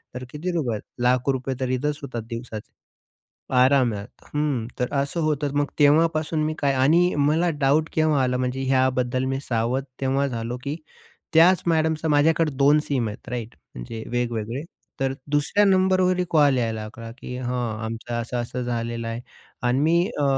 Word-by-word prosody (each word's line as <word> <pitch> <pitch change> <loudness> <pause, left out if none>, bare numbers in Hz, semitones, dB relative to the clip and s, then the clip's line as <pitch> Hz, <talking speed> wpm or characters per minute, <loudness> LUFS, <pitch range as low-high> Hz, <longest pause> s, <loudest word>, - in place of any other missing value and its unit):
तर 125 - -5
किती 170 +5 -4
रुपये? 125 -11 -1 0.2
लाख 125 +2 +2
रुपये 130 0 -1
तर 130 -1 -1
इथेच 150 +2 -2
होतात 125 -4 -5
दिवसाचे. 115 -2 -7 0.8
आरामात, 125 -5 +3 0.3
हं. 145 -6 0
तर 125 - -1
असं 150 +4 -2
होतंच. 145 -2 0
मग 145 0 +1
तेव्हापासून 155 +1 +3
मी 155 0 0
काय 140 -2 +2
आणि 160 +7 +4
मला 155 +5 +2
डाउट 150 +4 +3
केव्हा 155 -3 +2
आला 125 0 +1
म्हणजे 130 +1 -2
ह्याबद्दल 130 -1 +1
मी 135 - -1
सावध 120 +3 0 0.2
तेव्हा 135 +1 +1
झालो, 120 0 -4
की 140 +2 -3 0.6
त्याच 175 +3 +6
मॅडमचा 160 -1 +1
माझ्याकडे 155 +1 +3
2 145 +2 +5
सिम 125 -6 0
आहेत 105 +3 -8
राइट? 120 -2 -5 0.2
म्हणजे 110 - -6
वेगवेगळे, 120 +1 -2 0.4
तर 135 0 0 0.2
दुसऱ्या 145 +8 +2
नंबरवरही 185 -1 +3
कॉल 145 -4 +4
यायला 115 -2 -1
लागला 115 +1 -8
की 125 - -7
"हां, 120 -3 -2
आमचं 115 +1 -5
असं-असं 120 +1 -3
झालेलं 115 -1 -3
आहे" 115 +1 -4 0.5
अन् 130 +2 +2
मी 165 +2 +3 0.3
अ, - - +2
135 Hz, 160 wpm, -24 LUFS, 120-150 Hz, 0.8 s, त्याच